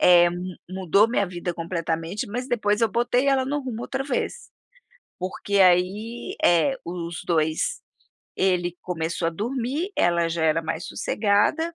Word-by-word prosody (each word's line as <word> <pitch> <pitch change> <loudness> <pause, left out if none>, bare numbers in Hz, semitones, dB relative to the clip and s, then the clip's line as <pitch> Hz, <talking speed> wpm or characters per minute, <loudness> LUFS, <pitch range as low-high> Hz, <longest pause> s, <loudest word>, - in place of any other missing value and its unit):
eh, 175 -1 +7
mu 180 +1 -6
mudou 190 +3 +3
minha 205 -4 +1
vida 175 -1 -4
completamente, 165 +2 -3
mas 245 +5 -4
depois 210 -3 +1
eu 230 - +4
botei 245 +4 +1
ela 265 -1 +3
no 290 +2 -1
rumo 240 -3 -5
outra 265 +2 -3
vez, 290 - -3 0.7
porque, 195 +2 -1
aí 190 +6 +2
eh, 175 - +4
os 170 -1 -5
2 160 -2 0 0.6
ele 180 -2 +1
começou 165 -1 -2
a - - +1
dormir, 255 - -2
ela 170 -1 +2
já 165 -1 -1
era 160 +1 +3
mais 160 +2 -3
sossegada, 225 +11 +1
185 Hz, 150 wpm, -24 LUFS, 170-240 Hz, 0.7 s, eh